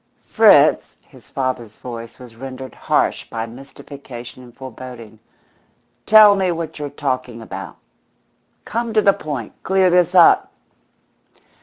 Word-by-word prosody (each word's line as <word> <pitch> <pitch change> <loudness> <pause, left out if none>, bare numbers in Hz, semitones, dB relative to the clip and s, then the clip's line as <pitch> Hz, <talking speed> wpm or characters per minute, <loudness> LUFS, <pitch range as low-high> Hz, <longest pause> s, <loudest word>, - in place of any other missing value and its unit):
"Fritz," - - +4
his - - -21
father's 130 -5 -4
voice 115 -2 -9
was 125 -3 -14
rendered 130 +1 -9
harsh - - -1
by 115 0 -4
mystification 130 0 -12
and 120 -1 -16
foreboding, 125 -4 -11 0.9
"tell 215 -2 +8
me 190 -2 0
what 165 -2 -6
you're 145 -1 -4
talking 130 -4 -4
about. 95 -5 -8 0.9
Come 230 0 -4
to 215 - +5
the 200 - +5
point. 140 -8 -6
Clear 190 -1 +2
this 180 0 +2
up." 175 -2 +5
130 Hz, 125 wpm, -19 LUFS, 120-170 Hz, 0.9 s, tell